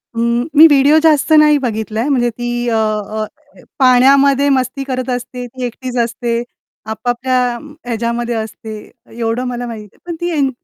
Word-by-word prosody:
उम्म, 235 +2 0
मी 315 - +10
video 290 0 +4
जास्त 310 -1 +3
नाही 300 -1 +5
बघितलाय 220 -2 -2
म्हणजे 245 -4 +2
ती 240 +1 -4
अ, 230 - 0
अ, 215 0 -1
काय 290 +5 -21 0.2
पाण्यामध्ये 275 +2 +5
मस्ती 260 0 0
करत 255 -1 -4
असते, 245 0 -4
ती 255 +2 -8
एकटीच 250 +1 -6
असते. 235 0 -2 0.5
आपापल्या 245 +2 -1 0.3
ह्याच्यामध्ये 235 0 -2
असते, 220 0 -6 0.4
एवढं 230 +1 -2
मला 245 0 -4
माहिती 220 -3 -8
आहे. - - -28
पण 340 - -3
ती 345 - -2
एन 275 -2 +2
245 Hz, 160 wpm, -16 LUFS, 230-270 Hz, 0.5 s, मी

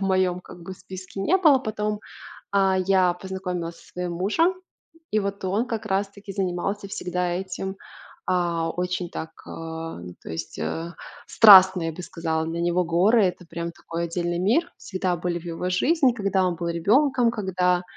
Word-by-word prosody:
в - - -5
моём 185 -2 +1
как 175 -1 -13
бы 190 - -7
списке 185 +1 -9
не 355 - +3
было. 305 -8 +5
Потом, 210 -3 -3 0.5
а, 195 -1 +3
я 185 -1 +3
познакомилась 180 -2 -5
со - - -18
своим 180 -1 -3
мужем, 220 - +2 0.6
и 215 - +2
вот 200 -1 -4
он, 205 +6 0
как 225 -3 -4
раз 195 0 0
таки, 200 0 -10
занимался 195 +1 -2
всегда 180 -2 -2
этим, 190 +1 -4 0.5
а, 170 -2 0
очень 180 0 -3
так, 160 - -6 0.2
а, 165 - -6 0.2
то - - -8
есть, 80 0 -6
э, 170 +1 -3 0.3
страстно, 190 -4 +8
я 165 - -2
бы 180 - -8
сказала. 160 -2 -2
Для 165 +1 -3
него 175 +1 +1
горы- 195 +7 +4
это 180 -1 -2
прям 170 0 -5
такой 170 0 -5
отдельный 175 0 -2
мир. 260 - +1
Всегда 185 -3 -2
были 175 0 -2
в - - -16
его 170 +2 -3
жизни, 270 - +3
когда 195 -4 +1
он 175 - 0
был 170 0 -3
ребенком, 240 - +3
когда, 180 -4 +1
185 Hz, 175 wpm, -24 LUFS, 175-200 Hz, 0.6 s, страстно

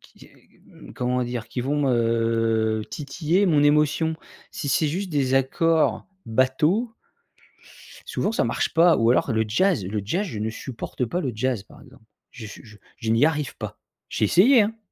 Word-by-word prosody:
qui - - -18
qui, - - -25 0.4
mmh, - - -14
comment 125 0 -1
dire? 120 -2 -5
Qui 125 - -4
vont, 140 +2 0
heu, 115 -2 +1
titiller 160 +6 -1
mon 155 -5 +3
émotion. 150 +2 +2 0.3
Si 190 -7 -5
c'est 150 +3 +2
juste 185 +5 -3
des 135 -4 0
accords 160 +5 +1 0.2
bateau 150 - +1 1.1
souvent, 430 - -1
ça 225 - 0
marche - - -1
pas. 165 +1 +5
Ou 115 +1 +3
alors 125 - +1
le 110 - +2
jazz. 125 - +1
Le 105 +2 -3
jazz, 175 - -1
je 115 - -6
ne 110 +1 -2
supporte 125 +2 -6
pas 175 +10 -3
le 135 -8 -2
jazz, 125 -1 -1
par - - -17
exemple. - - -18 0.3
Je 120 -3 -10
suis 105 - -10
je 110 -3 -15 0.2
je 115 -2 -3
n'y 115 +5 +4
arrive 150 -3 -1
pas. - - -7 0.3
J'ai - - -2
essayé, 220 - +5
hein. 215 +2 -2
135 Hz, 180 wpm, -23 LUFS, 115-165 Hz, 1.1 s, pas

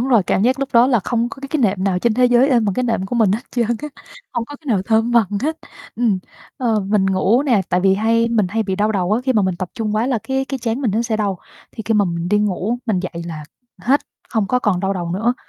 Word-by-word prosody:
Đúng 250 - -1
rồi, 235 -6 +4
cảm 190 - 0
giác 255 +3 +2
lúc 275 - -1
đó 235 +1 +6
là 245 -4 +2
không 235 +4 -1
có 275 - -11
cái 275 - -7
cái 305 -2 -1
nệm 195 -2 +1
nào 185 -2 +1
trên 230 +2 +1
thế 250 +1 +3
giới 245 +3 +4
êm 240 -4 +3
bằng 200 -2 0
cái 255 - 0
nệm 225 -6 -1
của 240 - -3
mình 210 -4 +3
hết 220 - -1
trơn 235 -3 0
á, 240 +6 -2 0.4
hông 240 -1 -2
có 290 +3 -10
cái 300 - -23
nào 205 -7 +1
thơm 225 +2 +1
bằng 230 -4 +4 0.2
hết. 315 +2 -1 0.4
Ừm, 225 -5 +1 0.4
ờ, 230 -5 +1
mình 195 0 +1
ngủ 195 +7 +2
nè, 240 -8 +2
tại 180 - +1
vì 190 0 +4
hay 230 +3 +2
mình 220 -5 +2
hay 225 +3 -1
bị 190 -2 -3
đau 210 +1 +1
đầu 185 0 0
á, 230 - +2
khi 260 - +2
mà 215 -3 +2
mình 185 -2 0
tập 185 -1 -4
trung 215 -2 -2
quá 225 +3 +1
là 250 -4 0
cái 265 0 -1
cái 270 0 -4
trán 235 +2 -2
mình 240 -7 0
nó 225 +4 0
sẽ 225 -2 -1
đau, 200 -4 -1 0.3
thì 220 - -7
khi 225 - +2
mà 205 -1 +4
mình 170 -1 -3
đi 210 +2 +3
ngủ 210 +3 -1
mình 205 -6 +1
dậy 175 -2 -5
là 155 -2 -6 0.4
hết, 275 +4 +3 0.3
không 220 -5 0
có 250 - +1
còn 210 -7 0
đau 195 0 0
đầu 175 -3 -4
nữa. 225 +7 0
220 Hz, 295 wpm, -19 LUFS, 195-245 Hz, 0.4 s, đó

